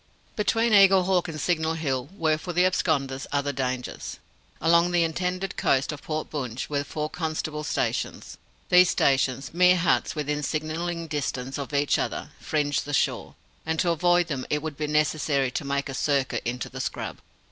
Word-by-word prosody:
Between 225 Hz, +2 st, +1 dB
Eaglehawk 190 Hz, -2 st, +5 dB
and 155 Hz, -2 st, -6 dB
Signal 160 Hz, -1 st, 0 dB
Hill 135 Hz, -5 st, -2 dB
were, 155 Hz, -1 st, +1 dB
for 175 Hz, -, -5 dB
the 180 Hz, +2 st, +3 dB
absconders, 140 Hz, -7 st, 0 dB
other 145 Hz, 0 st, 0 dB
dangers. 130 Hz, -2 st, -4 dB, 0.4 s
Along 170 Hz, +2 st, +4 dB
the 175 Hz, -1 st, +3 dB
indented 180 Hz, +3 st, -2 dB
coast 135 Hz, +2 st, +2 dB
of 150 Hz, -, -7 dB
Port 155 Hz, 0 st, -4 dB
Bunche 130 Hz, -3 st, -4 dB
were 145 Hz, -1 st, 0 dB
four 150 Hz, +1 st, -3 dB
constables' 155 Hz, -2 st, -3 dB
stations. -, -, -2 dB, 0.3 s
These 180 Hz, -1 st, +7 dB
stations 135 Hz, 0 st, +1 dB
mere 180 Hz, +1 st, +5 dB
huts 180 Hz, -1 st, +1 dB
within 150 Hz, 0 st, -2 dB
signalling 165 Hz, +3 st, -2 dB
distance 135 Hz, -3 st, -3 dB
of 140 Hz, -, -5 dB
each 145 Hz, 0 st, +2 dB
other -, -, -3 dB
fringed 145 Hz, -2 st, 0 dB
the 145 Hz, 0 st, -1 dB
shore, -, -, -1 dB, 0.3 s
and 160 Hz, 0 st, -2 dB
to 175 Hz, -, +2 dB
avoid 175 Hz, +1 st, +3 dB
them 140 Hz, -6 st, -3 dB
it 150 Hz, 0 st, -1 dB
would 155 Hz, -2 st, -4 dB
be 150 Hz, +1 st, -3 dB
necessary 150 Hz, -3 st, +1 dB
to 145 Hz, -, -3 dB
make 140 Hz, 0 st, -1 dB
a 135 Hz, -, -5 dB
circuit 140 Hz, -1 st, 0 dB
into 125 Hz, +1 st, -3 dB
the -, -, -6 dB
scrub. -, -, -4 dB
155 Hz, 170 wpm, -26 LUFS, 140-170 Hz, 0.4 s, These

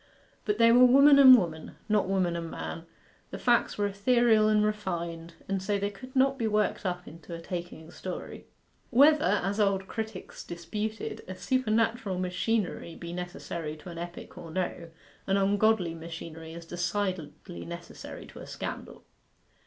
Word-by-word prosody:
But 210 Hz, -1 st, 0 dB
they 230 Hz, 0 st, +6 dB
were 245 Hz, +2 st, +7 dB
woman 280 Hz, +3 st, +7 dB
and 260 Hz, -2 st, +10 dB
woman, 160 Hz, -6 st, -4 dB
not 210 Hz, -3 st, +2 dB
woman 185 Hz, -3 st, +1 dB
and 165 Hz, -1 st, -4 dB
man, 165 Hz, 0 st, -6 dB, 0.4 s
the -, -, -6 dB
facts 240 Hz, -1 st, +2 dB
were 205 Hz, -, +1 dB
ethereal 215 Hz, +2 st, +3 dB
and 210 Hz, 0 st, +3 dB
refined, 170 Hz, -5 st, -3 dB
and 195 Hz, -1 st, -1 dB
so 200 Hz, +2 st, 0 dB
they 200 Hz, +1 st, -2 dB
could 255 Hz, +7 st, -12 dB
not 270 Hz, +1 st, +3 dB
be 225 Hz, -, +1 dB
worked 210 Hz, -2 st, 0 dB
up 180 Hz, 0 st, -4 dB
into 165 Hz, +1 st, -9 dB
a -, -, -7 dB
taking 170 Hz, -2 st, -7 dB
story. 185 Hz, 0 st, -7 dB, 0.4 s
Whether, 295 Hz, +4 st, +6 dB
as 195 Hz, +2 st, +1 dB
old 195 Hz, -2 st, +1 dB
critics 220 Hz, +1 st, -6 dB
disputed, 210 Hz, +6 st, -5 dB
a 185 Hz, -, -6 dB
supernatural 225 Hz, -2 st, 0 dB
machinery 185 Hz, -1 st, -1 dB
be 170 Hz, 0 st, -7 dB
necessary 170 Hz, -3 st, -5 dB
to 155 Hz, -, -11 dB
an 170 Hz, -1 st, -7 dB
epic 175 Hz, +1 st, -8 dB
or 170 Hz, -2 st, -9 dB
no, 170 Hz, 0 st, -3 dB, 0.4 s
an 195 Hz, 0 st, +2 dB
ungodly 200 Hz, -2 st, +2 dB
machinery 165 Hz, 0 st, -8 dB
is 170 Hz, 0 st, -9 dB
decidedly 175 Hz, 0 st, -3 dB
necessary 170 Hz, 0 st, -9 dB
to -, -, -12 dB
a -, -, -9 dB
scandal. -, -, -7 dB
190 Hz, 160 wpm, -28 LUFS, 170-220 Hz, 0.4 s, and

